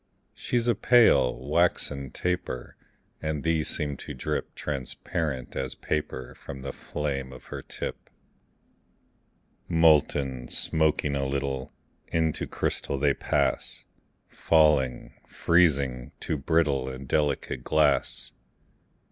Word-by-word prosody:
She's 120 -1 -1
a 120 - +5
pale, 115 - +5
waxen 75 -4 +1
taper; 90 -9 -3 0.5
And 75 -2 -2
these 80 -1 +1
seem 75 -2 -2
to - - -7
drip - - -3
Transparent 70 0 -3
as 65 -1 -2
paper 65 -4 -3
From 70 -1 -9
the - - -5
flame 70 -3 -4
of 65 - -12
her - - -5
tip. - - -6 1.6
Molten, 75 -6 +3
smoking 75 -1 +2
a 70 -1 0
little, 70 -1 -2 0.4
Into 80 -2 0
crystal 70 - -2
they 70 0 +3
pass; - - -1 0.4
Falling, 75 -6 +2
freezing, 70 -8 +2
to - - -1
brittle 70 -3 +1
And 65 0 -8
delicate 75 0 0
glass. 75 -2 +1
70 Hz, 105 wpm, -27 LUFS, 65-80 Hz, 1.6 s, a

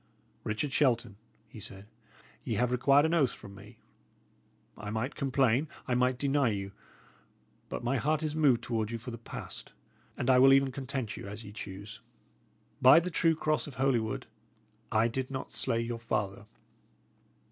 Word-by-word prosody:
"Richard 110 +7 -2
Shelton," 120 -7 +2 0.3
he 110 - -12
said, 100 -1 -8 0.6
"ye 115 - -2
have 125 +3 +1
required 140 +4 +4
an 160 - +1
oath 145 -7 +3
from 100 - -11
me. 105 +3 -14 1.0
I 105 -1 -7
might 110 +6 -2
complain, 135 0 +2 0.2
I 125 - 0
might 125 +1 +2
deny 140 -1 +2
you; 100 -2 -3 1.0
but - - -5
my 130 +3 +1
heart 155 +5 0
is 155 -1 -2
moved 135 -6 +3
toward 110 -3 -1
you 115 - -3
for 120 +3 -8
the 115 - -7
past, 115 - -8 0.4
and - - -2
I 130 -1 +6
will 135 +1 +8
even 135 0 +4
content 130 -4 -4
you - - -7
as 105 +3 -7
ye 100 - -9
choose. 100 0 -8 0.8
By 130 +5 +9
the 180 +2 -4
true 165 0 +3
cross 155 -1 0
of 140 - -9
Holywood, 125 -5 0 0.7
I 110 +1 +3
did 130 +2 -3
not 135 -1 -5
slay 115 - +1
your 115 0 -4
father." 105 -1 -3
125 Hz, 170 wpm, -30 LUFS, 110-135 Hz, 1.0 s, By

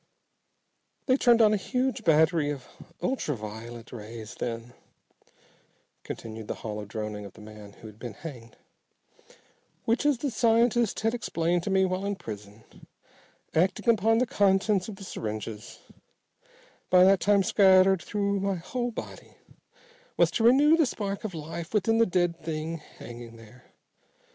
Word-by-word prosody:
"They 255 - +4
turned 240 -4 +5
on 215 -1 +5
a - - +2
huge 250 +4 -2
battery 160 -2 +3
of 140 -3 -5 0.4
ultra 255 - -1
violet 115 +2 -9
rays 110 -1 -8
then," 115 0 -5 1.3
continued 110 -1 -7
the - - -3
hollow 105 -1 -4
droning 105 0 -5
of 100 - -10
the - - -15
man 105 -1 -12
who - - -16
had 105 0 -14
been 120 -5 -7
hanged, 120 -7 -10 1.3
"which, 230 +4 +1
as 290 -3 +3
the 275 +2 -2
scientist 235 0 +2
had 225 +1 +1
explained 175 -7 0
to 185 - -4
me 190 0 +3
while 185 +1 -2
in 200 0 -1
prison, 105 - -9 0.9
acting 180 +8 +1
upon 225 +2 +2
the 250 - +3
contents 200 -2 +2
of 210 - -7
the 195 - -11
syringes, 110 - -6 1.1
by 180 0 +7
that 195 0 +5
time 200 +1 +3
scattered 190 -2 +5
through 200 -1 -1
my 195 0 0
whole 240 +8 -3
body, 230 - -9 0.8
was - - +4
to 225 - -1
renew 280 +7 +6
the 320 -4 +3
spark 200 -4 -4
of 205 -5 -5
life 160 +4 -6
within 225 +2 +2
the 230 - +5
dead 175 -2 0
thing 160 +1 -3 0.2
hanging 120 0 -10
there. 115 +2 -16
180 Hz, 150 wpm, -27 LUFS, -, 1.3 s, by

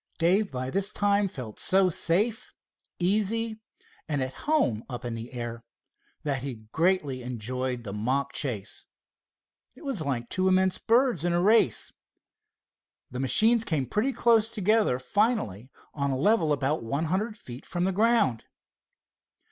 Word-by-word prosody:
Dave 190 +5 +2
by 130 0 -4
this 195 +4 0
time 205 0 +2
felt 125 - -8
so 190 -1 +3
safe, 210 +9 0 0.4
easy 215 +4 0 0.5
and 145 -2 0
at 130 0 -5 0.2
home 125 - +2
up 125 -1 -6
in 120 - -3
the 115 +1 -7
air, 120 -2 -5 0.6
that 140 -3 -1
he 120 -5 -7
greatly 160 -7 +1
enjoyed 125 +1 -4
the 100 -3 -6
mock 130 +6 -1
chase. 110 -8 -3 0.9
It - - -14
was 265 - -1
like 130 -5 -2
two 185 +7 0
immense 185 0 +2
birds 235 - +2
in 175 0 +1
a 175 - +2
race. 200 - +3 1.2
The 125 - -5
machines 220 - +4
came 155 -10 -1
pretty 210 - 0
close 230 -3 +3
together 215 - +2
finally 130 - -1 0.2
on 140 -1 -1
a 135 - -1
level 165 0 +2
about 145 +2 0
one 140 +8 -2
hundred 210 +7 -2
feet 125 -8 -10
from 175 - -2
the 190 - +1
ground. 210 - +2
165 Hz, 150 wpm, -27 LUFS, 125-210 Hz, 1.2 s, machines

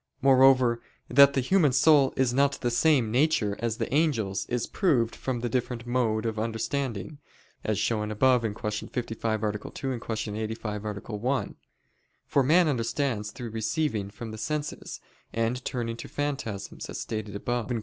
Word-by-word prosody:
Moreover, 130 -3 +5 0.3
that 140 +2 +7
the 135 - +2
human 155 +1 +3
soul 140 0 +5
is 130 -2 +2
not 140 +1 +3
of - - -15
the 120 - 0
same 125 -3 +3
nature 120 -6 +2
as 115 -1 -1
the - - -3
angels, 115 -11 +1
is 120 -1 -1
proved 130 - +1
from 125 -3 -3
the 120 - -1
different 120 0 -2
mode 120 -3 0
of 110 -1 -2
understanding, 115 +2 -3 0.4
as 110 -2 0
shown 105 +1 0
above 125 +3 +3
(Q. 105 -1 -3
55, 115 -2 -2
A. 105 - +2 0.2
2; 130 -3 -4
Q. 110 -2 -4
85, 110 -1 -4
A. - - -1 0.3
1): 125 +6 -1 0.7
for 140 - +2
man 165 +6 +4
understands 120 -4 -1
through 115 +1 -7
receiving 110 -2 -1
from 110 +2 -8
the 110 - -8
senses, 150 +5 -4 0.3
and 115 +3 -1
turning 115 -2 -3
to - - -8
phantasms, 140 -9 -4
as - - -5
stated 110 -2 -4
above 120 +2 -2
(Q. 120 -2 -1
120 Hz, 165 wpm, -27 LUFS, 110-135 Hz, 0.7 s, that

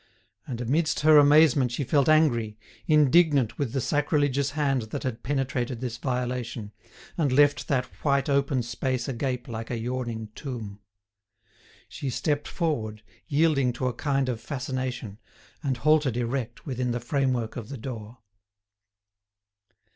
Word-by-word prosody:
And 120 -4 -5
amidst 150 +7 0
her 155 0 +7
amazement 145 -3 +5
she 125 - -2
felt 140 +2 +2
angry, 120 -9 +3 0.3
indignant 150 -4 +4
with 140 -5 -1
the 135 - -1
sacrilegious 145 0 +1
hand 135 -4 +1
that - - -4
had 125 -3 -3
penetrated 130 -3 -2
this 125 -1 -4
violation, 125 -4 -3 0.5
and 145 -5 +2
left 145 +2 +3
that 130 -2 +1 0.2
white 140 -2 +2
open 140 -2 +1
space 120 +1 -2
agape 125 -1 -3
like 115 -1 -6
a 120 - -2
yawning 120 -2 -4
tomb. 110 -8 -7 1.1
She 140 - -5
stepped 145 +3 -1
forward, 110 - -2 0.2
yielding 145 -4 +2
to 125 +2 -3
a 125 - 0
kind 135 -2 0
of 120 -3 -3
fascination, 130 -5 -4 0.4
and 135 -4 -1
halted 150 -3 +2
erect 120 0 -3
within 125 -3 -2
the 120 - -2
framework 125 -2 -1
of 115 -2 -7
the 140 - -6
door. 115 -2 -7
130 Hz, 140 wpm, -26 LUFS, 120-145 Hz, 1.1 s, her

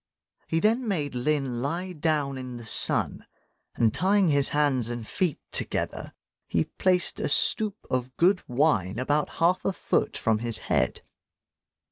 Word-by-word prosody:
He 165 - 0
then 230 +6 +1
made 150 -9 -2
Lin 130 -1 -1
lie 175 +7 -3
down 150 -3 -1
in 130 -2 -7
the 120 - -10
sun; - - +2 0.5
and 115 -2 +2
tying 195 0 +2
his 140 -2 +2
hands 140 -6 +1
and 120 -2 -5
feet 175 -6 -1
together, - - -3 0.3
he 80 - +1
placed 180 -2 0
a - - -1
stoup 215 +7 +4
of 130 0 -3
good 185 +2 +3
wine 120 - +1
about 145 +4 0
half 175 +2 +2
a - - 0
foot - - -1
from 110 -1 +1
his 115 0 -1 0.2
head. 65 - 0
145 Hz, 150 wpm, -26 LUFS, 125-180 Hz, 0.5 s, stoup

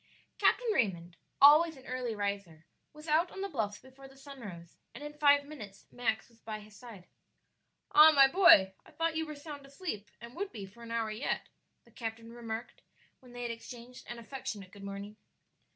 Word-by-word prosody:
Captain - - +3
Raymond, 175 - 0 0.2
always 305 +2 +7
an 265 - -15
early 250 -3 -3
riser, 200 -6 -4 0.3
was 305 +2 -13
out 320 +3 +3
on 385 - -8
the 395 - -1
bluffs 220 - -2
before 265 +1 -15
the 270 0 -18
sun 275 0 -11
rose, 170 -7 -10 0.2
and 275 - -8
in 295 0 -7
five 285 -1 +4
minutes 215 -10 -10
Max 220 -3 -1
was 230 -1 -25
by 215 -1 -6
his 210 0 -15
side. 220 -6 -12 0.9
"Ah, 305 +1 +9
my 275 -3 +7
boy, 300 - +7
I - - -18
though 330 0 +2
you 320 -1 -3
were 305 - -6
sound 285 -1 -9
asleep, 275 - -6
and 235 +1 -11
would 395 +2 -4
be 205 -3 -7
for 205 +5 -16
an 230 - -9
hour 230 -1 -1
yet," 220 +6 -3 0.4
the - - -22
captain 230 0 -6
remarked 230 0 -6 0.4
when 250 -1 -17
they 245 0 -7
had 240 - -2
exchanged 240 +2 -10
an 240 - -5
affectionate 225 -5 -7
good 200 -1 -13
morning. 200 +1 -7
240 Hz, 195 wpm, -32 LUFS, 210-285 Hz, 0.9 s, Ah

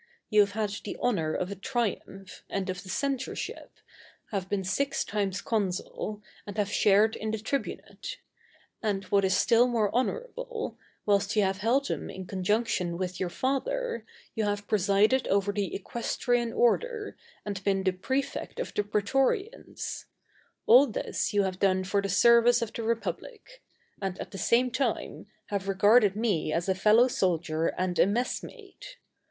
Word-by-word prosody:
You 215 - +5
have 200 -1 +1
had 210 -1 -1
the - - -5
honor 180 -11 0
of 185 +2 -2
a - - -4
triumph, 195 -3 -4
and 190 -1 -2
of 180 -1 -6
the 185 - -12
censorship, 270 +4 -3 0.6
have 190 -3 -3
been 200 -2 -1
six 275 +10 0
times 200 -2 -2
consul, 210 0 -2 0.2
and 205 - -7
have 205 -1 0
shared 210 +2 +4
in 220 - -4
the 220 - -1
tribunate; 275 - -4 0.6
and, 205 -3 -1
what 200 -1 +4
is 190 -1 +3
still 235 +1 +4
more 225 -4 0
honorable, 485 - -2 0.3
whilst 205 +1 +2
you 210 - +4
have 190 0 0
held 255 +7 +2
them - - -3
in 190 - -7
conjunction 185 -2 0
with 185 0 -4
your 185 - -1
Father, 275 - -2 0.3
you 220 - -1
have 205 0 -2
presided 210 +5 +3
over 200 +1 +2
the 200 -2 -2
Equestrian 235 +3 -1
order, 425 - +1 0.3
and 200 -2 -4
been 195 -1 +1
the 190 - +3
Prefect 265 - -3
of - - -4
the - - +1
Prætorians: 270 - -1 0.6
all 255 +5 +7
this 220 - -2
you 205 -1 +3
have 190 -1 -3
done 185 -1 +2
for 200 +2 0
the 200 - -3
service 235 +4 +5
of 225 - -6
the - - -4
Republic, 410 - -4 0.4
and, 190 -2 -3
at - - -7
the 195 - -7
same 245 +2 +3
time, 255 -5 -2 0.2
have 200 -1 -2
regarded 205 +1 +5
me 205 -9 0
as 170 +3 -1
a 190 - +3
fellow 215 +6 +5
soldier 165 -7 0
and 180 -1 -2
a - - +6
messmate. 400 - -4
210 Hz, 160 wpm, -28 LUFS, 195-245 Hz, 0.6 s, all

